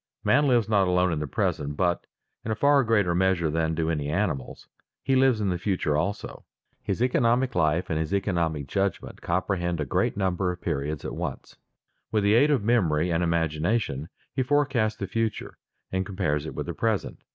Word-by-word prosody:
Man 145 0 +3
lives 120 -4 +3
not 100 -3 +3
alone 90 -1 +2
in 75 - -2
the 75 - -3
present 70 +2 -2
but, 90 -2 0 0.4
in - - -5
a 110 - 0
far 140 +3 +4
greater 105 -6 +2
measure 90 -3 +1
than 80 0 0
do 80 0 0
any 75 -2 -2
animals, 80 -7 -2 0.4
he 135 - +2
lives 130 -3 +4
in 100 -2 0
the 90 -1 -1
future 90 -5 0
also. 85 +7 -3 0.4
His 100 +5 -1
economic 125 0 +2
life 80 0 +1
and 80 - -1
his 80 -1 -2
economic 85 -7 0
judgment 95 +6 -2
comprehend 90 -1 -1
a 75 - -1
great 65 - 0
number 95 -1 0
of 90 - -7
periods 70 0 -3
at - - -4
once. - - -5 0.6
With 105 -2 +1
the 100 +1 +4
aid 140 +6 +5
of 140 -8 +2
memory 90 -8 +2
and 85 +1 +1
imagination 80 - 0 0.2
he 135 - 0
forecasts 130 -5 +1
the 100 - -3
future, 115 +1 -3 0.3
and 95 0 0
compares 90 -7 -2
it - - -7
with 75 - -3
the 85 - -4
present. 110 +2 -1
90 Hz, 190 wpm, -26 LUFS, 80-110 Hz, 0.6 s, aid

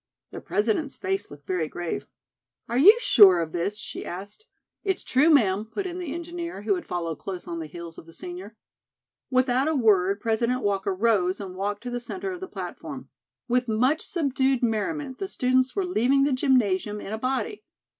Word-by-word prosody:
The - - -7
President's 230 +7 -1
face 385 0 -2
looked 145 0 -13
very 180 -4 -1
grave. 175 +1 -4 0.6
"Are 240 +2 0
you 410 - +9
sure 195 - +7
of 165 -1 -2
this?" 180 +5 -1
she - - -6
asked. 200 - -8 0.4
"It's 385 -2 -1
true, 275 +5 +3
ma'am," 210 -10 +4
put 375 - -5
in 360 0 -4
the 345 -6 -4
engineer, 340 - -6
who 210 -1 +2
had 180 - -4
followed 170 -3 -3
close 185 -2 -6
on 170 -1 -4
the 160 - -5
heels 170 +1 -9
of 160 - -15
the 165 - -14
senior. 185 +5 -8 0.7
Without 255 +1 +2
a 315 - +1
word, 200 -5 +3
President 235 +3 0
Walker 195 -1 0
rose 195 -3 +2
and 190 -3 -7
walked 205 +3 -3
to 245 - -5
the 245 - -2
centre 375 +11 -5
of 365 - -6
the 375 - -6
platform. - - -7 0.4
With 250 0 +1
much 250 +8 +2
subdued 270 -5 0
merriment 260 +5 -1
the 390 - -2
students 255 -5 +1
were 390 - 0
leaving 275 -4 +2
the 280 -1 +2
gymnasium 215 -6 +1
in 205 - -6
a 220 - -3
body. 270 - -2
235 Hz, 190 wpm, -26 LUFS, 195-280 Hz, 0.7 s, you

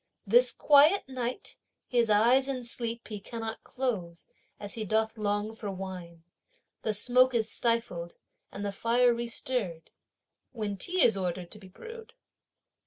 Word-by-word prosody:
This - - +6
quiet 295 +6 +5
night 255 +4 -5 0.3
his 240 -3 +2
eyes 240 +6 +4
in 260 -2 -3
sleep 235 -1 -3
he 210 -2 -5
cannot 225 +2 -6
close, 190 -10 -4 0.3
as 205 - -7
he 225 -2 -4
doth 220 +2 0
long 210 0 -2
for 220 -2 -6
wine. 180 -3 -8 0.6
The 220 - -1
smoke 250 +4 +3
is 220 -1 0
stifled, 230 -8 -1 0.4
and 200 +1 -6
the 200 - -1
fire 240 +4 +3
restirred, 235 -7 -2 0.6
when 210 -4 -3
tea 360 - +1
is 225 - +5
ordered 180 -2 -4
to 210 - -9
be 190 - -13
brewed. 455 - -11
225 Hz, 145 wpm, -29 LUFS, 200-250 Hz, 0.6 s, This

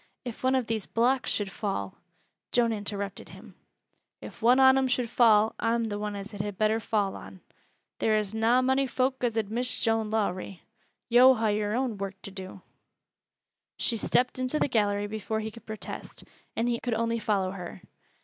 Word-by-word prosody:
"If 240 -2 -6
one 260 +1 +2
of 255 -2 +1
these 220 -3 -3
blocks 250 +3 +1
should 205 -2 -1
fall 145 - -4 0.3
" - - -51
Joan 235 -2 +3
interrupted 200 -2 -4
him: - - -13 0.7
"If - - -11
one 245 +3 +5
on 265 0 +7
'em 265 -1 +2
should 250 -2 -1
fall, 220 -3 +5
I'm 230 0 +1
th' 205 - -3
one 210 0 -3
as 200 +2 -7
it 200 - -3
had 205 -2 -5
better 215 +1 +2
fall 210 -3 -1
on. 190 - -11 0.6
There 215 -1 +2
is 210 -1 -2
na 230 +3 +3
mony 265 +1 +2
foak 260 +1 -1
as 230 -2 0
ud 215 -2 -1
miss 245 +2 -2
Joan 225 -2 +1
Lowrie. 195 -4 -2 0.4
Yo' 250 +2 +7
ha' 225 - -5
work 220 - +2
o' 205 - +1
yore 210 0 -1
own 210 -7 -2
to 200 - -6
do." 190 0 -8 1.2
She 235 - +1
stepped 250 +4 +1
into 255 +4 0
the - - +2
gallery 205 -4 +1
before 220 +1 -3
he 220 0 -4
could 230 0 -15
protest, 220 -1 -7 0.3
and 230 +2 0
he 235 -1 0
could 245 -3 -2
only 230 0 0
follow 195 -4 0
her. 180 -1 -8
220 Hz, 195 wpm, -28 LUFS, 205-245 Hz, 1.2 s, on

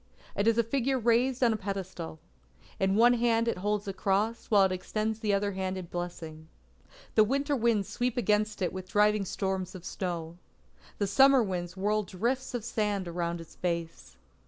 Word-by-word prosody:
It 200 - 0
is 230 0 +4
a 235 - +4
figure 265 +3 0
raised 245 +2 +2
on 235 -2 +4
a - - -1
pedestal. 190 - -5 0.6
In 190 0 +2
one 240 +3 +6
hand 230 -1 +2
it 230 - -1
holds 205 +1 -1
a 195 - -2
cross, 205 +4 0
while 205 -3 +6
it 190 - +2
extends 215 +4 -2
the 215 -2 0
other 200 0 +1
hand 190 0 -3
in 185 - -5
blessing. 165 -2 -6 0.7
The 215 - +6
winter 280 +6 0
winds 225 -5 +1
sweep 245 0 -2
against 210 -2 +1
it 180 - -1
with 185 0 -7
driving 210 -1 +3
storms 190 -1 -3
of 180 -1 -10
snow. 170 -2 -4 0.6
The 205 - 0
summer 265 +5 +5
winds 180 -2 -4
whirl 210 +2 +1
drifts 235 +8 -2
of 230 -3 -4
sand 210 -5 -1
around 170 0 -3
its 165 - -13
base. 170 - -4
205 Hz, 180 wpm, -29 LUFS, 185-230 Hz, 0.7 s, one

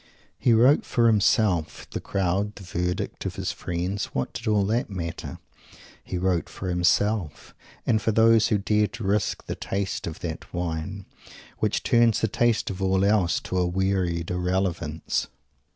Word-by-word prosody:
He 120 - +3
wrote 125 +6 +5
for 120 - +1
himself. 100 -7 +2
The - - -4
crowd, 100 +2 -1
the 100 - -10
verdict 90 0 -3
of - - -5
his - - -2
friends 90 +3 -3
what 65 - -3
did 115 - -6
all 105 -2 +3
that 115 +4 0
matter? 85 -4 -5 0.7
He 90 - -4
wrote 90 -3 0
for 95 - -5
himself; 90 -1 0 0.3
and 110 -2 +2
for 110 - +1
those 115 0 +5
who 105 - +2
dare 105 +1 +2
to 115 0 -8
risk 100 +1 0
the - - -3
taste 95 -3 -3
of 80 - -7
that 80 -1 -6
wine, 90 +3 -4 0.5
which - - 0
turns 120 -2 +4
the 110 - +2
taste 115 0 +1
of 95 0 -6
all 95 0 +2
else 100 -5 +2
to 95 - -2
a 90 - +2
weary 90 -2 0
irrelevance! 90 -3 -1
95 Hz, 165 wpm, -25 LUFS, 90-105 Hz, 0.7 s, wrote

